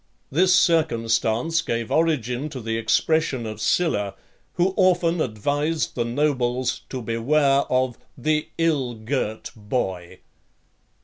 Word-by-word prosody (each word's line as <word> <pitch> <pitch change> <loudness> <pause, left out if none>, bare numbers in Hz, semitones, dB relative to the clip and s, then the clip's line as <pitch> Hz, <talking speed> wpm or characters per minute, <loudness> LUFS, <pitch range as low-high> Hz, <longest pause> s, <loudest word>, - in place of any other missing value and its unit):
This 180 +6 +4
circumstance 120 -2 +2
gave 115 -1 -3
origin 150 -4 0
to 135 - -7
the 115 -1 -3
expression 130 +2 +1
of 110 -1 -6
Sylla, 105 - +1 0.4
who 185 +1 +1
often 175 -3 +2
advised 145 +8 -1
the 120 - -1
nobles 125 -1 0
to 130 -2 -5
beware 135 +5 +2
of 130 -2 +1 0.2
"the 155 0 0
ill 145 -7 0
girt 110 -1 -3
boy." 105 -5 -4
130 Hz, 115 wpm, -23 LUFS, 115-155 Hz, 0.4 s, This